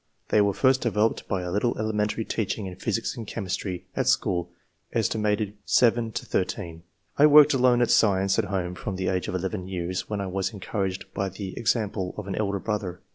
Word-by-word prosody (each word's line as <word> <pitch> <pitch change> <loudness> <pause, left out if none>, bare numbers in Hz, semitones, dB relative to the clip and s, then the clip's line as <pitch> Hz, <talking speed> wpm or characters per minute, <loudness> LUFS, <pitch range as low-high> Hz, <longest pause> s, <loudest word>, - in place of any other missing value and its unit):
They 105 - +4
were 100 -1 +2
first 130 -1 +3
developed 110 -1 0
by 95 -3 -1
a 90 - -4
little 105 +5 0
elementary 110 0 -1
teaching 105 -1 -2
in 95 -1 -6
physics 115 +4 -2
and 115 -4 -7
chemistry, 95 -3 -4
at - - 0
school, 85 -1 +1 0.5
set. 105 -1 0
7 115 -1 +3
13. 85 -5 -3 0.4
I 145 - +8
worked 150 0 +8
alone 125 -2 +4
at 120 - +1
science 95 -1 +3
at 110 - +1
home, 95 -2 -2
from 95 +2 -5
the 95 0 -1
age 90 -1 -1
of - - -3
11 95 +1 -3
years, 90 0 -3
where 105 -1 -2
I 100 - -2
was 95 +3 -2
encouraged 95 -2 -3
by 100 -1 -1
the 95 0 -7
example 110 -5 -1
of 105 - -5
an 100 - -4
elder 100 -1 -1
brother. 100 -3 -3
100 Hz, 190 wpm, -26 LUFS, 95-110 Hz, 0.5 s, I